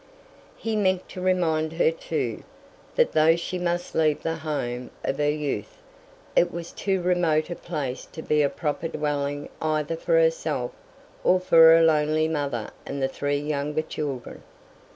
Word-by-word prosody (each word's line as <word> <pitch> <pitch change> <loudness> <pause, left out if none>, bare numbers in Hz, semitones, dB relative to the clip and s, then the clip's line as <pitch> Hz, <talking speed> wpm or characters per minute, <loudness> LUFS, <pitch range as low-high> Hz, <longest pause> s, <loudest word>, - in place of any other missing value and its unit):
He 225 -1 -2
meant 185 -3 +1
to 185 - -7
remind 165 -4 +1
her, 475 - +3
too, - - -3 0.5
that 485 - +3
though 155 +1 +5
she 180 +2 -4
must 175 0 -2
leave 155 -2 +2
the 165 0 -1
home 125 -6 -3
of 135 - -2
her 145 0 +2
youth, 145 -8 -3 0.6
it 175 - +4
was 170 0 -6
too 190 -3 -1
remote 175 -3 +2
a - - -2
place 145 -8 -4
to 160 - -7
be 150 0 +2
a 140 - +3
proper 155 +2 -2
dwelling 145 -2 -2
either 155 0 0
for 330 - -2
herself - - +2 0.5
or 185 - +4
for 180 -2 +2 0.2
her 165 - +5
lonely 155 0 +3
mother 140 -8 -2
and 140 - -5
the 135 - +1
three 145 +1 -1
younger 150 +1 -2
children. 140 -5 -5
155 Hz, 160 wpm, -25 LUFS, 145-175 Hz, 0.6 s, though